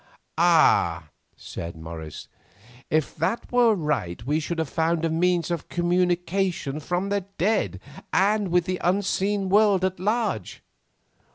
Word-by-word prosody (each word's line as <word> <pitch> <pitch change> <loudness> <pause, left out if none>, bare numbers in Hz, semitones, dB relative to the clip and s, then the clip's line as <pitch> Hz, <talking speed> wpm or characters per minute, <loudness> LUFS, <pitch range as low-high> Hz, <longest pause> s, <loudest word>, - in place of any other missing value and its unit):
"Ah!" 90 - +3 0.3
said 85 0 -7
Morris, 80 -1 -8 0.6
"if 155 -1 0
that 185 +9 -2
were 240 -3 +4
right 125 - -2
we 150 +4 +1
should 165 +2 -4
have 160 -2 -1
found 165 +2 0
a 165 - 0
means 175 0 +1
of 170 -3 -4
communication 175 -3 0
from 180 +5 -2
the 200 0 0 0.2
dead 170 - 0 0.3
and 205 +1 +2
with 175 -1 +2
the 185 0 -3
unseen 195 +2 0
world 200 -1 +4
at 185 -1 -2
large." 205 - -2
175 Hz, 130 wpm, -24 LUFS, 150-195 Hz, 0.6 s, were